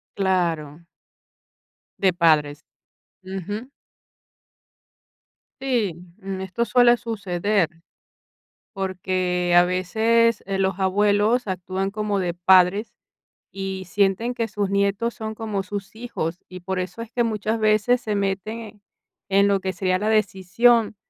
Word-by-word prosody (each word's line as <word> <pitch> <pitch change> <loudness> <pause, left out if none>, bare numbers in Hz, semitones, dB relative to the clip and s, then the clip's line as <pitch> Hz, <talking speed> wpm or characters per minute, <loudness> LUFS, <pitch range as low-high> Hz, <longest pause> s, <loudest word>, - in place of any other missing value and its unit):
Claro. 170 -5 -1 1.1
De 190 -2 +3
padres. 155 -3 +2 0.6
Ujú. 205 +7 -6 1.9
Sí, 235 -10 0 0.2
mm, 195 -1 -5
esto 190 +5 -2
suele 245 0 +5
suceder, 205 -5 -1 1.1
porque 185 -2 -1
a 175 - +8
veces 220 +5 +2
eh, 195 -1 -1
los 190 0 0
abuelos 205 +4 +2
actúan 190 +1 -3
como 210 -1 -1
de 175 -2 -1
padres, 185 +4 +3 0.6
y 190 -1 -5
sienten 205 +5 +1
que 230 -1 -1
sus 205 -2 -2
nietos 200 +4 0
son 220 0 -5
como 210 -3 -3
sus 200 +2 -7
hijos. 180 -8 -4
Y 185 0 -9
por 190 +1 -4
eso 185 +5 -4
es 230 0 -8
que 240 - +1
muchas 220 0 -1
veces 215 +3 +3
se 215 - -3
meten, 205 +2 -3 0.5
en 200 +1 +4
lo 200 -1 +2
que 190 0 -3
sería 185 0 0
la 210 +3 -1
decisión 215 +2 +2
195 Hz, 120 wpm, -23 LUFS, 185-220 Hz, 1.9 s, a